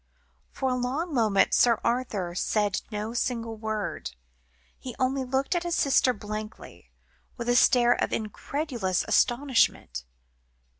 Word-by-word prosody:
For 265 - -2
a 255 - +1
long 270 +7 -2
moment 215 -6 +3
Sir 235 -2 +4
Arthur 220 -8 -1
said 205 +2 0
no 215 +1 -4
single 230 -2 -2
word; 215 - -4 0.6
he 250 -3 -8
only 265 +1 0
looked 265 +4 -1
at 350 - 0
his 345 -1 -2
sister 270 -2 +3
blankly, 215 -1 -8 0.5
with 235 -1 -5
a 245 - +3
stare 245 -1 +5
of - - -2
incredulous 225 - -2
astonishment. 240 - +1
240 Hz, 130 wpm, -27 LUFS, 215-260 Hz, 0.6 s, stare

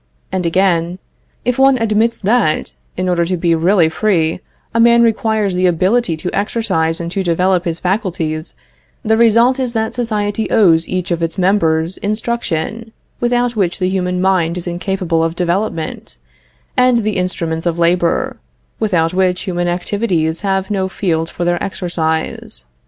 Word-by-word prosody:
And 185 -2 -1
again: 175 -1 +1 0.5
"If 250 +1 0
one 270 -1 +5
admits 225 0 +1
that, 205 -6 +1 0.2
in 185 0 -1
order 175 -1 +2
to 180 +2 -1
be 170 0 +1
really 170 +1 +3
free, 165 -2 0 0.3
a 230 - +1
man 235 0 +6
requires 220 -3 +1
the 180 0 +2
ability 185 +1 +1
to 180 +3 -4
exercise 195 -7 0
and 170 0 -4
to 195 - -1
develop 180 0 +1
his 170 -1 -2
faculties, 175 -5 -2 0.5
the 220 +1 +3
result 235 +3 +4
is 250 -3 -1
that 220 -1 -1
society 215 -3 -1
owes 165 -6 +4
each 185 -1 -3
of 170 -1 -1
its 165 +1 -2
members 175 -3 +1
instruction, 220 -1 -3 0.3
without 240 0 +1
which 185 -5 0
the 185 -1 0
human 180 -1 -1
mind 180 -3 +1
is 175 - -5
incapable 175 -2 -1
of 165 0 -1
development, 175 - -2 0.6
and 250 -2 +3
the 215 -1 -1
instruments 170 -2 -2
of 170 -1 -1
labor, 170 0 +1 0.4
without 180 -6 +1
which 185 -1 +1
human 175 -3 -2
activities 175 -2 -1
have 195 -1 -1
no 190 -2 0
field 165 -4 -1
for 175 - -4
their 175 0 0
exercise. 160 - -3
185 Hz, 155 wpm, -16 LUFS, 170-215 Hz, 0.6 s, man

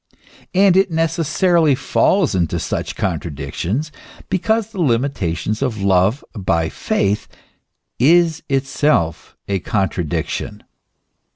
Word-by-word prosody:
And 190 -1 +5
it 195 0 +4
necessarily 165 -1 +2
falls 185 - +2
into 85 -4 0
such - - -3
contradictions, 85 - -3 0.4
because 220 +3 0
the 195 -5 -4
limitation 115 - 0
of 120 -6 -2
love 95 +6 +2
by 85 -7 0
faith 100 +1 -1 0.7
is 165 +4 +4
itself 135 - 0
a 100 -1 0
contradiction. 95 -4 -2
130 Hz, 95 wpm, -19 LUFS, -, 0.7 s, And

